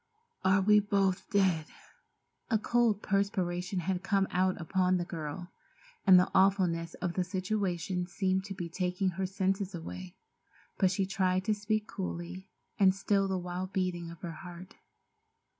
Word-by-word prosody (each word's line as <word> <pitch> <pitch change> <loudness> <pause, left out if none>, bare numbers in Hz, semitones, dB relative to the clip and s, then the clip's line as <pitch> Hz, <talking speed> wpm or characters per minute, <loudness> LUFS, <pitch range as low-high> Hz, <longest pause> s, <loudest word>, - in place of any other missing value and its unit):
"Are 190 +1 +4
we 210 +2 +6
both 195 -2 0
dead?" 190 -7 +2 0.8
A 225 - +3
cold 225 -1 +1
perspiration 185 -2 0
had 180 +1 -1
come 195 -1 +1
out 185 +1 +1
upon 185 +2 +1
the 175 - -2
girl, 170 +1 -6 0.6
and 185 -1 +9
the 180 - +3
awfulness 185 -4 +2
of 180 -2 -3
the 185 - 0
situation 185 -2 -2
seemed 190 +1 0
to 195 -1 -6
be 175 -2 -4
taking 180 +2 -1
her 185 +1 -2
senses 195 0 -1
away, 90 - -8 0.6
but 190 - +4
she 190 +1 0
tried 185 -1 0
to 215 - +2
speak 210 +1 -1
coolly, 185 -1 -6 0.3
and 190 -1 +5
still 195 0 +1
the 190 -1 -1
wild 180 +1 -5
beating 180 -3 -1
of 170 -1 -11
her 170 - -5
heart. 180 0 -10
185 Hz, 155 wpm, -31 LUFS, 180-195 Hz, 0.8 s, and